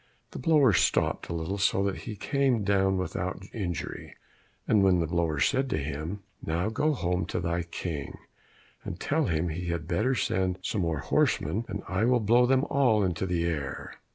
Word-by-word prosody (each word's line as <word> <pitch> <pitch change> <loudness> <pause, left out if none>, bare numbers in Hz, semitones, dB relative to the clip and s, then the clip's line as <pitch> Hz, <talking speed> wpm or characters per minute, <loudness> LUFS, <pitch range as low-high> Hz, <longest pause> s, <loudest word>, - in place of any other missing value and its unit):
The - - -7
blower 140 -5 +4
stopped 90 - +1
a - - -2
little 85 +5 -3
so 95 0 +2
that 100 -1 0
he 110 - -7
came 130 -1 +1
down 95 -1 +2
without 90 0 -3
injury, 90 - -5 0.5
and 105 -3 +4
then 95 -2 +5
the 85 - +1
blower 80 -2 0
said 130 - +2
to - - 0
him, 80 +7 -4 0.2
"Now 85 +6 -1
go 150 +7 +1
home 90 -3 -1
to - - -2
thy 85 0 -1
King, 85 -3 -5 0.7
and 85 - -6
tell 155 +1 +1
him 85 -3 0
he 85 +3 -4
had 85 -2 -3
better 110 +11 +1
send 95 -5 0
some 100 - -1
more 80 -4 -1
horsemen, 95 +11 +1
and 105 -2 -5
I 95 +5 +1
will 125 0 +4
blow 120 +3 +4
them 130 +1 +3
all 125 -8 +3
into 90 0 -1
the 85 -2 0
air." 75 -5 -3
95 Hz, 185 wpm, -28 LUFS, 85-110 Hz, 0.7 s, then